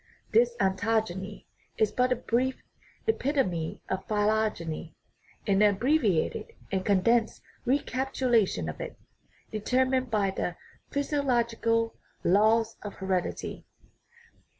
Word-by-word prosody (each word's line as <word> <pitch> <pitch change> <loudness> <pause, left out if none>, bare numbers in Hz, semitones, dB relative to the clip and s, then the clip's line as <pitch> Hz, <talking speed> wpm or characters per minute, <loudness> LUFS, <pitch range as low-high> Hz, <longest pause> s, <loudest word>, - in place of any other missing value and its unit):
This 235 +2 +4
ontogeny 200 0 0 0.3
is 215 -2 +2
but 250 0 +1
a - - +4
brief 250 +2 -1 0.4
epitome 260 - 0
of 190 0 -2
phylogeny, 210 -7 0 0.5
an 195 0 +3
abbreviated 210 - +2 0.2
and 190 -1 0
condensed 220 +4 +2 0.2
recapitulation 255 - +1
of 75 - -5
it, - - -6 0.5
determined 255 +4 +1
by 205 -3 +1
the 180 -2 -3 0.3
physi 285 0 -1
ological 230 -2 +1 0.3
laws 220 +4 +3
of 205 - -7
heredity. 190 -2 -3
220 Hz, 100 wpm, -28 LUFS, 195-250 Hz, 0.5 s, This